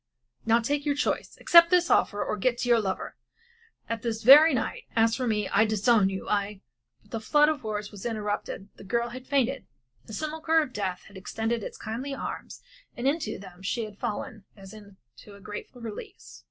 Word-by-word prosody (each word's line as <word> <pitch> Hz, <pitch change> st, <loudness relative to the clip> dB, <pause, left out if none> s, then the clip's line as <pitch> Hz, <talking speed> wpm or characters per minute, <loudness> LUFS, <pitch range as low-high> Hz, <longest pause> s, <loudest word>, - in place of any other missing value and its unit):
Now 230 Hz, +1 st, +5 dB
take 285 Hz, +5 st, -1 dB
your 290 Hz, -1 st, 0 dB
choice 285 Hz, -, -2 dB
accept 335 Hz, -1 st, +7 dB
this 355 Hz, -1 st, +3 dB
offer 205 Hz, -, +2 dB
or -, -, -1 dB
get 240 Hz, +4 st, 0 dB
to 245 Hz, -, -3 dB
your 235 Hz, -1 st, +5 dB
lover 195 Hz, -2 st, -4 dB, 0.7 s
and 230 Hz, -2 st, -3 dB
this 225 Hz, -2 st, -3 dB
very 295 Hz, +7 st, +9 dB
night. 255 Hz, -, -2 dB
As 225 Hz, 0 st, +3 dB
for 255 Hz, -2 st, -2 dB
me, 210 Hz, -3 st, 0 dB
I 210 Hz, -, +4 dB
disown 215 Hz, -1 st, +3 dB
you, 190 Hz, -1 st, -6 dB
I 200 Hz, -1 st, -1 dB, 0.2 s
" -, -, -51 dB
But -, -, -26 dB
the 225 Hz, -, -3 dB
flood 295 Hz, +7 st, +4 dB
of 310 Hz, -4 st, -2 dB
words 210 Hz, -1 st, -4 dB
was 205 Hz, -2 st, -10 dB
interrupted 210 Hz, -3 st, -4 dB
the -, -, -12 dB
girl 235 Hz, +4 st, -1 dB
had 255 Hz, +2 st, -10 dB
fainted. 275 Hz, -1 st, 0 dB, 0.4 s
The -, -, -9 dB
simulachre 315 Hz, +5 st, +1 dB
of 260 Hz, -, -9 dB
death 190 Hz, -3 st, -3 dB
had 200 Hz, -, -14 dB
extended 225 Hz, +4 st, -3 dB
its -, -, -7 dB
kindly 255 Hz, +6 st, -5 dB
arms, -, -, -7 dB, 0.3 s
and 245 Hz, +2 st, -1 dB
into 315 Hz, +3 st, -1 dB
them 185 Hz, -2 st, -13 dB
she 225 Hz, +4 st, -2 dB
had 210 Hz, -1 st, -12 dB
fallen 235 Hz, -1 st, -4 dB
as 195 Hz, +1 st, -12 dB
into 200 Hz, -, -15 dB
a -, -, -14 dB
grateful 210 Hz, +5 st, -9 dB
release. 205 Hz, -, -9 dB
225 Hz, 200 wpm, -27 LUFS, 205-260 Hz, 0.7 s, very